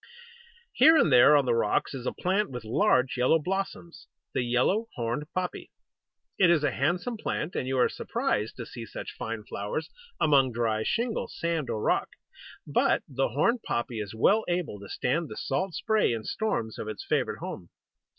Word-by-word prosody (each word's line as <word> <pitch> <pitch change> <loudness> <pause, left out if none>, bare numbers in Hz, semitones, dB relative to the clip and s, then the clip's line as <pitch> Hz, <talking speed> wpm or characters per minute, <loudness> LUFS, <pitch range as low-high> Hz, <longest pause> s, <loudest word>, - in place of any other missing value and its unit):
Here 320 0 +7
and 165 - +4
there 125 +4 +8
on 140 - +2
the 120 - +2
rocks 115 +3 +1
is 130 -2 -5
a - - +1
plant 195 +4 0
with 125 -2 -6
large 125 - +2
yellow 125 +6 +4
blossoms 180 0 -4 0.3
the - - +1
Yellow 125 - +1
Horned 120 +4 -2
Poppy. 185 -1 -4 0.7
It 185 -3 +6
is 165 -3 +3
a 145 - +2
handsome 175 - -1
plant, 180 -5 -3
and 130 - -2
you 130 0 -1
are 125 - +5
surprised 105 +2 -2
to 120 - -6
see 115 -1 -8
such - - -7
fine 115 -1 -5
flowers 105 +9 -4 0.3
among 135 -4 +4
dry 110 -2 0
shingle, 230 - -1
sand, 165 -6 -2
or 110 -2 -2
rock; - - +1 0.6
but - - +2
the 135 0 -1
Horned 220 - +1
Poppy 120 - -3
is 105 0 -5
well 210 - +4
able 175 - -2
to 100 - -11
stand 160 +5 -1
the - - -8
salt 160 +7 -2
spray 220 - +2
and 110 -1 -4
storms 115 - -2
of - - -5
its 110 -1 -6
favourite - - 0
home. - - -7
135 Hz, 180 wpm, -28 LUFS, 115-180 Hz, 0.7 s, there